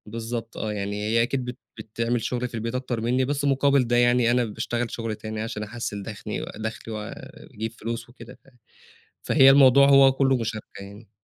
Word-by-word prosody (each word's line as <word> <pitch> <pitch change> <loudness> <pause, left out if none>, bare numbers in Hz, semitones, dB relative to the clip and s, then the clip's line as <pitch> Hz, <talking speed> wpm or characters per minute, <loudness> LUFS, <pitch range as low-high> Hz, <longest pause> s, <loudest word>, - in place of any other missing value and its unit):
بالضبط 115 +1 -6
آه، 110 - -3
يعني 100 0 -4
هي 115 +1 +3
أكيد 130 +1 -2
بت 125 0 -6 0.2
بتعمل 115 +2 -2
شُغل 125 0 -2
في 120 - -17
البيت 115 +2 -4
أكتر 125 -3 -3
منّي 125 +3 +1
بس 145 +1 -2
مقابل 140 -2 +3
ده 120 - +1
يعني، 120 0 +3
أنا 120 0 +2
باشتغل 120 +2 -3
شُغل 115 -2 -4
تاني 110 0 -6
عشان 110 -1 -4
أحَسّن 105 -2 -5
دخني 105 +1 -6
دخلي 110 +1 -6
وأجيب 105 +1 -7
فلوس 115 +1 -6
وكده، 120 0 -13
ف - - -28 0.8
فهي 135 - +6
الموضوع 135 0 +7
هو 135 -1 +7
كله 135 0 +2
مشاركة 110 -3 -6
يعني. 100 +2 -13
115 Hz, 180 wpm, -24 LUFS, 110-125 Hz, 0.8 s, الموضوع